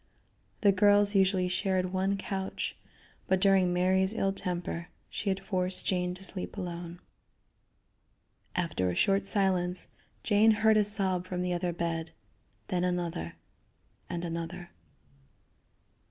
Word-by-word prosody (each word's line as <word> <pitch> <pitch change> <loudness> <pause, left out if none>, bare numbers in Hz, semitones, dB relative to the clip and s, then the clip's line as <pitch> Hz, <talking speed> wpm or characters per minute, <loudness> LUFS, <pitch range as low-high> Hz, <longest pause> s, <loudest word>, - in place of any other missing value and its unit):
The 200 - +6
girls 205 +1 +4
usually 190 -2 +3
shared 185 0 0
one 190 +1 +1
couch, 195 -2 -4 0.5
but 190 - +2
during 190 -2 +4
Mary's 190 +3 +2
ill 195 -3 +1
temper 175 -2 -3 0.2
she 205 - -2
had 190 0 0
forced 185 -1 0
Jane 180 -1 0
to 190 - -8
sleep 195 +1 -4
alone. 175 -2 -5 1.6
After 165 - 0
a 90 - -2
short 195 - +2
silence 185 -3 0 0.4
Jane 215 +1 +4
heard 220 0 +6
a 210 - +5
sob 190 -3 0
from 180 -1 -2
the 180 0 -1
other 175 0 -1
bed, 165 -1 -3 0.6
then 180 -1 0
another, 175 - -2 0.7
and 175 0 -3
another. 170 +1 -5
185 Hz, 125 wpm, -30 LUFS, 175-195 Hz, 1.6 s, The